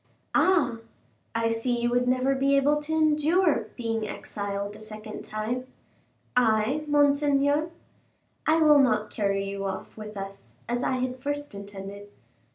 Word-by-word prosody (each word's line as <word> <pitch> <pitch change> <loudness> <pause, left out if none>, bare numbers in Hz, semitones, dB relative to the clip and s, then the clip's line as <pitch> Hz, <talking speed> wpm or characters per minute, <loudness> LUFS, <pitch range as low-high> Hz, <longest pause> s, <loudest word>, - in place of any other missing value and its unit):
"Ah! 325 -11 +3 0.6
I 230 0 +1
see 235 +2 0
you 240 0 0
would 245 0 +2
never 255 +2 +2
be 275 +1 +3
able 295 +2 +3
to 300 +1 -6
endure 315 +2 +3
being 225 -3 -2
exiled 200 0 -4
a - - -11
second 215 0 -8
time." 230 +4 -3 0.7
"I, 245 +5 +2
monseigneur?" 290 +1 +3 0.8
"I 320 +1 +4
will 300 -1 +7
not 215 -5 +2
carry 195 -2 0
you 195 0 -4
off 190 0 -5
with 215 -1 -8
us, 195 0 -8
as 240 +1 -1
I - - 0
had 255 0 -2
first 290 -1 -3
intended." 200 0 -8
245 Hz, 145 wpm, -27 LUFS, 215-290 Hz, 0.8 s, will